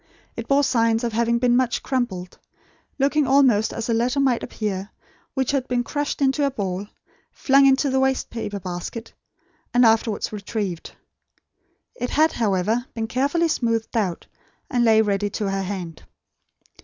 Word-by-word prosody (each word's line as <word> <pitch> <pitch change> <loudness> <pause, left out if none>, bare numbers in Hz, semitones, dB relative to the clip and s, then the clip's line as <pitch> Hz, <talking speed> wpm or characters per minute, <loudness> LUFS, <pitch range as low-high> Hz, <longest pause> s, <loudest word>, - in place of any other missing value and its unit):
It 230 0 -6
bore 280 +1 +3
signs 230 -3 +2
of 235 -2 -2
having 235 +1 +1
been 240 0 +2
much 250 -1 +1
crumpled; 190 -9 -3 0.6
looking 285 +1 +2
almost 260 -6 +4
as 230 - -4
a 235 - +1
letter 245 +5 +1
might 260 -4 +2
appear 200 -2 -4 0.5
which 265 -1 0
had 270 -2 -1
been 245 -1 0
crushed 290 +1 -2
into 270 +2 +2
a 280 - +3
ball, 200 -5 -4 0.4
flung 275 0 +4
into 270 +2 +3
the 265 - +2
waste 265 0 0
paper 210 -3 -4
basket, 180 +5 -6 0.6
and 245 0 +6
afterwards 220 -1 +1
retrieved. 200 -4 -4 1.0
It 245 0 -4
had, 315 +2 +3
however, 220 +3 0
been 225 -1 -2
carefully 280 +9 +1
smoothed 230 -7 -1
out; 190 -7 -1 0.5
and 245 -3 +2
lay 220 -1 +5
ready 205 -1 0
to 200 -1 -3
her 195 0 -1
hand. 180 -4 -5
235 Hz, 155 wpm, -23 LUFS, 205-265 Hz, 1.0 s, and